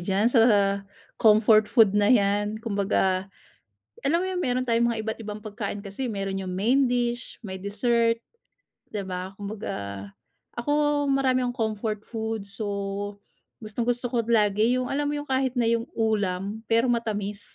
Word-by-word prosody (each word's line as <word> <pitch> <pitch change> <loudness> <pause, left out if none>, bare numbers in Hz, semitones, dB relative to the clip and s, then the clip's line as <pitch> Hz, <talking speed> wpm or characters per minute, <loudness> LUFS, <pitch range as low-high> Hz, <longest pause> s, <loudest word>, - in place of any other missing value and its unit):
diyan 195 +4 +1
sa 235 - +6 0.8
comfort 215 0 +5
food 225 -6 +5
na 205 0 +3
yan. 205 -2 +2
Kumbaga, 195 -3 0 0.8
alam 320 +5 +3
mo - - -1
'yun, 370 -1 -2
meron 255 -6 0
tayong 235 0 +3
mga 225 -1 -2
iba't 220 +1 -4
ibang 210 -1 -6
pagkain 205 -1 -5
kasi, 205 +6 -4
eh. - - -3
Meron 195 -1 -3
'yung 185 -1 -4
main 245 +8 +3
dish, 245 0 -2
may 190 -2 -6
dessert, 230 +3 +1 0.7
di 210 - -2
ba? 185 0 -5
Kumbaga, 100 - -5 0.5
ako 240 +5 -1 0.4
marami 270 -2 +2
akong 245 0 -4 0.2
comfort 215 0 -3
food 220 -2 -4
so, 200 0 -4 0.5
gustong-gusto 240 +3 -1
ko - - -1
lagi, 220 +1 +3
'yung 255 0 -1
alam 290 +1 0
mo 295 - -1
'yung 290 0 -6
kahit 260 -1 +1
na 245 - +2
'yung 230 0 +1
ulam, 205 -2 -1
pero 230 +2 +3
matamis. 210 -3 -2
220 Hz, 155 wpm, -26 LUFS, 200-240 Hz, 0.8 s, sa